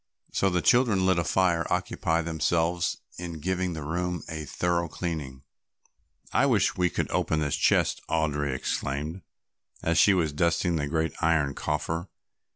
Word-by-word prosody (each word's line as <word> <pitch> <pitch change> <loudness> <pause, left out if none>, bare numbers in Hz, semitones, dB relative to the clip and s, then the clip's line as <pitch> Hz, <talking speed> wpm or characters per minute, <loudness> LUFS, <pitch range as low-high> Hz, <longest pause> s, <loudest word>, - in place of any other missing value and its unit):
So 95 - +2
the 90 -2 0
children 115 -7 +4
lit 95 -2 +3
a - - +1
fire 85 0 +2
and - - -3
occupied 80 0 0
themselves 85 +1 0 0.2
in 90 -1 -5
giving 90 +2 -1
the 80 -2 -5
room 90 +3 -2
a 80 -2 -5
thorough 85 +2 0
cleaning. 75 -6 -5 0.9
"I - - +4
wish - - +2
we 90 -1 +2
could - - -2
open 80 - +1
this 75 -2 0
chest," - - +2
Audry 75 -3 0
exclaimed, 70 +6 -3 0.6
as 85 0 +2
she 100 - +6
was 80 -5 0
dusting 85 +2 +1
the 75 -2 -1
great 80 +2 -1
iron 80 -4 +2
coffer. 80 +5 -2
85 Hz, 160 wpm, -27 LUFS, 75-90 Hz, 0.9 s, she